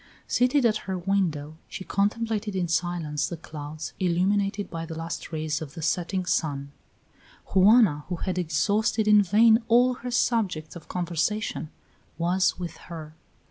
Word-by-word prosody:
Seated 250 Hz, +2 st, +2 dB
at 215 Hz, -2 st, +3 dB
her 190 Hz, -, -1 dB
window 170 Hz, -5 st, -1 dB
she 190 Hz, -, -7 dB
contemplated 210 Hz, +1 st, -1 dB
in 180 Hz, -2 st, 0 dB
silence 165 Hz, -3 st, -1 dB
the 170 Hz, -, -5 dB
clouds 155 Hz, 0 st, -7 dB
illumined 190 Hz, +3 st, +2 dB, 0.2 s
by 165 Hz, -1 st, -4 dB
the 165 Hz, -1 st, -7 dB
last 165 Hz, +1 st, -5 dB
rays 155 Hz, 0 st, -2 dB
of 145 Hz, -3 st, -8 dB
the 165 Hz, -, -6 dB
setting 180 Hz, +3 st, -1 dB
sun. 140 Hz, -5 st, -1 dB, 0.8 s
Juana, 190 Hz, -6 st, +5 dB
who 180 Hz, -, -1 dB
had 185 Hz, +1 st, -2 dB
exhausted 205 Hz, +6 st, +1 dB
in 210 Hz, -1 st, +7 dB
vain 220 Hz, +4 st, +5 dB
all 245 Hz, +2 st, +5 dB
her 250 Hz, 0 st, -7 dB
subjects 200 Hz, -11 st, 0 dB
of 170 Hz, -, -11 dB
conversation, 175 Hz, +1 st, -2 dB, 0.5 s
was 180 Hz, +2 st, +1 dB
with 175 Hz, -2 st, -6 dB
her. 155 Hz, -2 st, -8 dB
180 Hz, 145 wpm, -26 LUFS, 160-210 Hz, 0.8 s, in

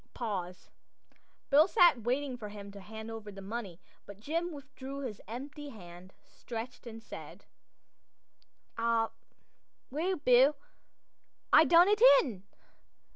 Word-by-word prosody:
Pause. 185 Hz, -6 st, -5 dB, 0.8 s
Bill 300 Hz, +4 st, +6 dB
sat 345 Hz, -10 st, +5 dB
waiting 255 Hz, +3 st, -1 dB
for 215 Hz, -4 st, -8 dB
him 200 Hz, -1 st, -9 dB
to 200 Hz, -, -11 dB
hand 220 Hz, +3 st, -9 dB
over 220 Hz, -2 st, -8 dB
the 195 Hz, -, -11 dB
money; 195 Hz, -3 st, -6 dB, 0.3 s
but 200 Hz, -1 st, -11 dB
Jim 335 Hz, +9 st, -2 dB
withdrew 275 Hz, -2 st, -8 dB
his 235 Hz, -7 st, -6 dB
hand 255 Hz, +6 st, -7 dB
empty, 185 Hz, -, -11 dB
stretched, 240 Hz, +1 st, -8 dB
and 225 Hz, -1 st, -9 dB
said: -, -, -10 dB, 1.3 s
"Ah, 230 Hz, -1 st, +1 dB, 0.8 s
well, 340 Hz, +7 st, -1 dB
Bill, 270 Hz, -1 st, +4 dB, 1.0 s
I 320 Hz, -, +8 dB
done 345 Hz, +2 st, +6 dB
it 420 Hz, +1 st, +2 dB, 0.2 s
in. 220 Hz, -10 st, -7 dB
235 Hz, 125 wpm, -31 LUFS, 210-285 Hz, 1.3 s, I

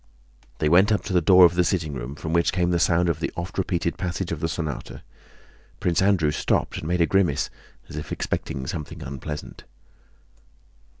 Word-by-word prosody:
They 75 Hz, -, 0 dB
went 95 Hz, +7 st, +5 dB
up 105 Hz, -, +1 dB
to 100 Hz, -, -4 dB
the 90 Hz, -, +4 dB
door 90 Hz, +2 st, +7 dB
of 85 Hz, -, +4 dB
the 90 Hz, 0 st, +3 dB
sitting 85 Hz, -5 st, -1 dB
room 65 Hz, +1 st, -6 dB
from 80 Hz, +2 st, -5 dB
which 85 Hz, 0 st, +3 dB
came 90 Hz, -1 st, +1 dB
the 85 Hz, -, +2 dB
sound 85 Hz, +1 st, +3 dB
of 85 Hz, -, 0 dB
the -, -, -2 dB
oft 85 Hz, +3 st, -5 dB
repeated 85 Hz, -2 st, -1 dB
passage 90 Hz, 0 st, -3 dB
of 85 Hz, -, -3 dB
the 80 Hz, -, -1 dB
sonata. 80 Hz, -4 st, -5 dB, 0.8 s
Prince 85 Hz, 0 st, +1 dB
Andrew 95 Hz, -6 st, +3 dB
stopped -, -, 0 dB
and 75 Hz, -, -6 dB
made 90 Hz, +1 st, +1 dB
a -, -, +6 dB
grimace, 90 Hz, -6 st, +1 dB, 0.4 s
as -, -, -10 dB
if 75 Hz, -, -6 dB
expecting 65 Hz, -1 st, -3 dB
something 75 Hz, 0 st, -6 dB
unpleasant. 70 Hz, +3 st, -7 dB
85 Hz, 190 wpm, -24 LUFS, 75-90 Hz, 0.8 s, door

